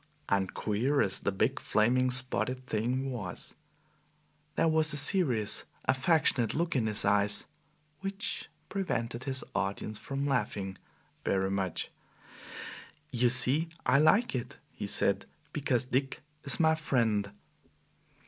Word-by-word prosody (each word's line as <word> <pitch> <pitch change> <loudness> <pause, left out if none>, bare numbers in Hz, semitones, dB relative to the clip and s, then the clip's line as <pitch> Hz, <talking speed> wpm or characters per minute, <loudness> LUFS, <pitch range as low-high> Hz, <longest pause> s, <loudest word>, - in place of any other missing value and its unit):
And 95 -2 0
queer 125 +8 0
as - - +3
the 100 - -1
big, 110 +7 0
flaming, 125 +4 +2
spotted 130 0 -1
thing 125 +5 -1
was, 105 -8 -3 1.0
there - - +2
was 160 -1 +3
a - - -1
serious, 140 - +4 0.2
affectionate 130 -4 +2
look 165 +1 -1
in 115 -4 +1
his 105 -1 +1
eyes, 100 0 +2 0.5
which 195 +1 -4 0.2
prevented 120 - -3
his 130 -2 -2
audience 100 +2 -3
from 140 0 -4
laughing 105 -7 -2 0.4
very 95 0 0
much. 95 -3 -2 1.2
"You 120 -1 +2
see, 135 +7 +5 0.2
I 125 +3 +4
like 205 +10 +4
it," 125 -2 -5
he - - -6
said, - - +3 0.3
"because 130 -4 0
Dick 135 +2 -2 0.2
is 140 - +3
my 160 -1 +4
friend." 115 -9 0
125 Hz, 125 wpm, -30 LUFS, 105-145 Hz, 1.2 s, see